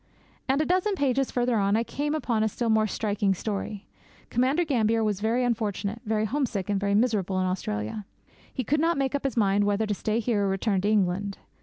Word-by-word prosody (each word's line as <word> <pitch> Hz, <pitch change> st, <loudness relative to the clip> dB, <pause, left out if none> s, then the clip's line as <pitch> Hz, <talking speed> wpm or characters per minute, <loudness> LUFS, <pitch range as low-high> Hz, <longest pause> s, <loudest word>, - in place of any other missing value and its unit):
And 270 Hz, +1 st, +2 dB
a 310 Hz, -, +2 dB
dozen 370 Hz, +4 st, +1 dB
pages 270 Hz, -4 st, +1 dB
farther 245 Hz, -1 st, +1 dB
on 200 Hz, 0 st, +2 dB
I 230 Hz, -, +1 dB
came 295 Hz, +5 st, -2 dB
upon 240 Hz, -8 st, 0 dB
a 220 Hz, -, +2 dB
still 235 Hz, +2 st, -2 dB
more 220 Hz, 0 st, +3 dB
striking 205 Hz, -1 st, 0 dB
story. 205 Hz, +1 st, -4 dB, 0.5 s
Commander 265 Hz, +8 st, +2 dB
Gambier 230 Hz, -5 st, +2 dB
was 210 Hz, -3 st, 0 dB
very 230 Hz, +4 st, +1 dB
unfortunate, 215 Hz, -2 st, -2 dB
very 215 Hz, 0 st, +1 dB
homesick, 225 Hz, -6 st, -1 dB
and 200 Hz, -, +1 dB
very 200 Hz, 0 st, +1 dB
miserable 205 Hz, -5 st, +1 dB
in 185 Hz, -, +1 dB
Australia. 180 Hz, -, -3 dB, 0.4 s
He 260 Hz, -, -3 dB
could 295 Hz, +6 st, +1 dB
not 330 Hz, +1 st, +2 dB
make 270 Hz, -1 st, 0 dB
up 285 Hz, -1 st, -2 dB
his 270 Hz, -, -1 dB
mind 205 Hz, -2 st, +3 dB
whether 205 Hz, +2 st, +1 dB
to 210 Hz, -, -1 dB
stay 215 Hz, +3 st, -1 dB
here 220 Hz, -3 st, +1 dB
or -, -, +1 dB
return 195 Hz, 0 st, 0 dB
to 205 Hz, -, +1 dB
England. 200 Hz, -1 st, +1 dB
220 Hz, 210 wpm, -26 LUFS, 200-255 Hz, 0.5 s, more